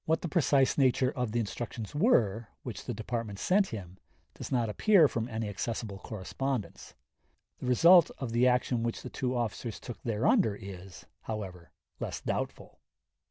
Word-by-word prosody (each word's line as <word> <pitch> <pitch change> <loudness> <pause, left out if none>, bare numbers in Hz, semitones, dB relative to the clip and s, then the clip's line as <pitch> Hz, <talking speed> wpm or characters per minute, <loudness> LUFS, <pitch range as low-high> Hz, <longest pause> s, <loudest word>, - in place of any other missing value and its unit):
What 160 +1 +1
the - - -1
precise 140 -4 +3
nature 130 -1 +3
of 125 -6 -2
the 120 - 0
instructions 115 0 -5
were, 115 - +2 0.2
which - - -7
the - - -3
Department 115 -4 -4
sent 190 - +2
him, 95 - -8 0.3
does - - -8
not 120 -3 +1
appear 170 - +5
from 115 -3 -3
any 110 -2 -3
accessible 105 0 -4
correspondence. 115 +5 -4 0.6
The - - -5
result 170 +7 +7
of 130 -4 -4
the 120 +2 +4
action 125 -1 +2
which 115 0 -3
the 125 - -7
two 125 -1 -2
officers 115 -1 -3
took 120 - -8
thereunder 120 - +2
is, 95 -2 -10 0.2
however, 95 -6 -6 0.3
less - - -4
doubtful. - - -4
120 Hz, 160 wpm, -30 LUFS, 105-135 Hz, 0.6 s, result